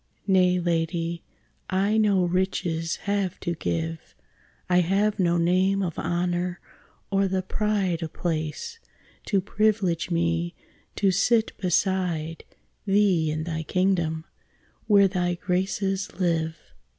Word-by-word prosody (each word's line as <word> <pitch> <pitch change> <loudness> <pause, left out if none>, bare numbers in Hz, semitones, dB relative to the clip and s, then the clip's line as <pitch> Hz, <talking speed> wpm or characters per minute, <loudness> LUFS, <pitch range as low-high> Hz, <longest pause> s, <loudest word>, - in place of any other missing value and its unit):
Nay, 185 -2 +4
lady, 170 0 -1 0.5
I 200 +3 +2
no 200 -4 +3
riches 175 -2 -1
have 200 -3 -1
to 170 - -1
give; 165 0 -4 0.5
I 180 0 +4
have 200 +4 +1
no 175 -2 +3
name 185 +3 +2
of 170 -4 -3
honour, 175 +1 -1 0.5
or 195 0 +2
the 190 0 -1
pride 195 -4 0
Of 160 -1 -4
place, 170 - -3 0.5
to 200 - +2
priv'lege 200 -4 +1
me 170 0 0 0.4
to 195 -2 +2
sit 220 +4 +2
beside 180 -4 0 0.4
Thee 195 -5 +3
in 155 +1 -2
thy 160 -1 -3
kingdom, 165 -2 0 0.6
where 200 -2 +6
thy 180 -2 -1
graces 190 +2 -1
live. 165 -3 0
180 Hz, 115 wpm, -25 LUFS, 170-195 Hz, 0.6 s, where